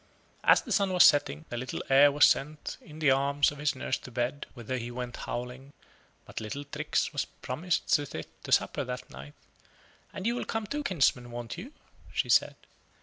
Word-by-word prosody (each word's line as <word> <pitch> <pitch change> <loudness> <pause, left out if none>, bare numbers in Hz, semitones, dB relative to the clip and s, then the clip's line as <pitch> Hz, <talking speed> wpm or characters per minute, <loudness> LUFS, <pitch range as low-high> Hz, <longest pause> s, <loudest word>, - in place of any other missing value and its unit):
As - - +5
the - - -8
sun 200 -2 +2
was 180 - +7
setting, 80 - +4
the 120 - -4
little 125 +2 -4
heir 140 +2 +6
was 145 +1 +6
sent 150 +2 0
in 150 - -13
the 155 -4 +3
arms 140 +2 +2
of 145 - -10
his 150 -1 0
nurse 130 0 -2
to - - -11
bed, 125 +4 -3
whither 125 +1 -4
he 120 0 -5
went 120 0 -5
howling; 125 +3 -6 0.5
but - - -7
little 110 +7 -5
Trix 150 +3 -2
was 145 - -1
promised 165 +8 -3
to 145 -1 +3
sit - - -9
to - - -7
supper 145 - +2
that 125 -1 -6
night 65 +3 -11 0.8
"and 190 - -7
you 235 - +2
will 245 - -3
come 225 -1 -3
too, 290 +8 -3
kinsman, 140 - +1
won't 120 -1 -6
you?" 205 +11 -8 0.4
she - - -1
said. - - +4
140 Hz, 200 wpm, -29 LUFS, 125-150 Hz, 0.8 s, was